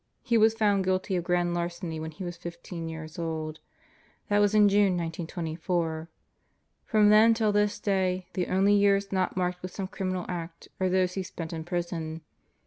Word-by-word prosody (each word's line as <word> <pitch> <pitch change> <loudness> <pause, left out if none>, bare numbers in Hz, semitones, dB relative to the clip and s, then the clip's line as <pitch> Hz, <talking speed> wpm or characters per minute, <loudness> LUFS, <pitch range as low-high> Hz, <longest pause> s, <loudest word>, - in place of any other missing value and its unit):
He 235 - +1
Was 220 0 +5
found 205 -3 +2
guilty 185 0 0
of 175 - 0
grand 175 0 +1
larceny 175 -1 -3
when 160 0 -4
he 160 +4 -8
was 175 -1 -5
fifteen 170 -1 -7
years 160 0 -8
old. 160 -1 -3 0.7
That 205 0 +3
was 205 0 +3
in 210 -1 +7
June, 200 -2 +3
1924. 165 0 -3 0.8
From 210 -1 +4
then 220 +2 +7
till 220 -2 +2
this 205 0 +1
day, 185 -3 0
the 180 - -1
only 195 +2 +3
years 200 -1 +3
not 185 -1 0
marked 180 0 -1
with 185 - -5
some 195 +1 -5
criminal 185 -2 -3
act 170 -1 -6
are 185 -1 +1
those 185 0 +2
he 190 - -2
spent 170 -2 -6
in 160 -1 -4
prison. 170 -2 -3
180 Hz, 180 wpm, -28 LUFS, 170-200 Hz, 0.8 s, in